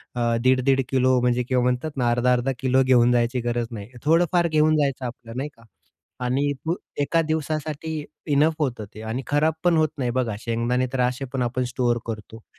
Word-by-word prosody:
अ, 120 Hz, -, -2 dB, 0.2 s
1.5-1.5 130 Hz, +1 st, +3 dB
kilo 130 Hz, -1 st, +3 dB
म्हणजे 125 Hz, 0 st, +1 dB
किंवा 125 Hz, 0 st, +1 dB
म्हणतात 125 Hz, +5 st, 0 dB
ना 120 Hz, -2 st, +2 dB
अर्धा-अर्धा 125 Hz, +2 st, +2 dB
किलो 130 Hz, 0 st, +3 dB
घेऊन 125 Hz, -2 st, +4 dB
जायची 120 Hz, +1 st, +1 dB
गरज 120 Hz, 0 st, -1 dB
नाही. 105 Hz, -3 st, -7 dB, 0.2 s
थोडंफार 170 Hz, +2 st, +3 dB
घेऊन 155 Hz, -1 st, +3 dB
जायचं 140 Hz, -3 st, 0 dB
आपलं, 120 Hz, -1 st, -8 dB
नाही 145 Hz, +3 st, -3 dB
का? 115 Hz, -, -19 dB, 0.6 s
आणि 135 Hz, +3 st, +1 dB, 0.5 s
एका 165 Hz, +4 st, +2 dB
दिवसासाठी 155 Hz, 0 st, -3 dB, 0.3 s
इनफ 150 Hz, +3 st, +4 dB
होतं 125 Hz, -7 st, -2 dB
ते. 110 Hz, -, -8 dB
आणि 110 Hz, +4 st, -3 dB
खराब 150 Hz, +2 st, +2 dB
पण 175 Hz, -2 st, +4 dB
होत 155 Hz, -1 st, +3 dB
नाही. 125 Hz, -3 st, -1 dB
बघा, 120 Hz, -5 st, 0 dB
शेंगदाणे 120 Hz, +3 st, 0 dB
तर 135 Hz, -, -1 dB
असे 125 Hz, +2 st, 0 dB
पण 130 Hz, -, -1 dB
आपण 125 Hz, +1 st, 0 dB
स्टोअर 120 Hz, -2 st, +1 dB
करतो. 110 Hz, 0 st, -7 dB
130 Hz, 180 wpm, -24 LUFS, 120-145 Hz, 0.6 s, घेऊन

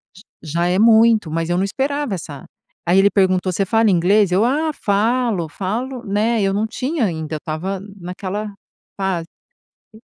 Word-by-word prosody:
J 195 Hz, -, -15 dB, 0.2 s
já 170 Hz, +3 st, -1 dB
é 180 Hz, +2 st, +1 dB
muito. 220 Hz, -5 st, +5 dB
Mas 165 Hz, +1 st, -2 dB
eu 175 Hz, -, +1 dB
não 185 Hz, -, +1 dB
esperava 270 Hz, +2 st, -2 dB
essa 145 Hz, -5 st, -9 dB, 0.4 s
aí 175 Hz, +2 st, +3 dB
ele 200 Hz, +1 st, +5 dB
perguntou: 185 Hz, -1 st, +2 dB
"Você 195 Hz, +2 st, 0 dB
fala 225 Hz, +2 st, +3 dB
inglês?", 185 Hz, +2 st, +3 dB
eu: 195 Hz, +4 st, +3 dB
"Ah, 305 Hz, +5 st, +1 dB
falo, 220 Hz, -, 0 dB
falo", 235 Hz, -, -4 dB
né, 215 Hz, +3 st, +1 dB
eu 195 Hz, -1 st, +1 dB
não 210 Hz, +2 st, 0 dB
tinha 255 Hz, +4 st, -2 dB
ainda, 160 Hz, -4 st, -3 dB
eu -, -, -2 dB
estava 170 Hz, +6 st, -4 dB, 0.2 s
naquela 190 Hz, +4 st, -5 dB, 0.5 s
fase 190 Hz, -4 st, -1 dB, 0.7 s
e 220 Hz, -, -15 dB
195 Hz, 170 wpm, -19 LUFS, 180-225 Hz, 0.7 s, muito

